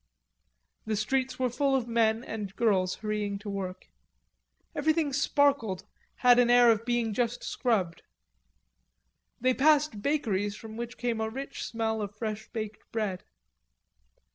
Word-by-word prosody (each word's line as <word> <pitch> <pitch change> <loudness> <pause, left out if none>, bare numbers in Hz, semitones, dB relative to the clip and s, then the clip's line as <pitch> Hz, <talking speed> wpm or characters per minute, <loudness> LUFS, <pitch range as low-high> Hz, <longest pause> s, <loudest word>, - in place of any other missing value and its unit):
The 220 - 0
streets 260 +5 0
were 255 -2 0
full 275 +2 +1
of 250 -3 0
men 230 -1 +2
and 210 -4 -6
girls 190 -5 +2
hurrying 210 -2 -2
to 205 0 -7
work. 185 -2 -5 0.9
Everything 305 -1 +1
sparkled, 280 - +2 0.4
had 245 0 +8
an 245 -1 +4
air 245 -1 +7
of 225 0 0
being 240 -2 0
just 235 +2 -1
scrubbed. 200 -10 0 1.4
They 255 +2 +3
passed 290 -5 +3
bakeries 205 -8 0
from 220 0 -10
which 235 +1 -6
came 235 -2 -1
a 220 - -1
rich 270 +5 -6
smell 220 -1 -2
of 205 0 -5
fresh 215 -1 -4
baked 215 -2 -5
bread. 210 -5 -2
225 Hz, 140 wpm, -29 LUFS, 210-250 Hz, 1.4 s, had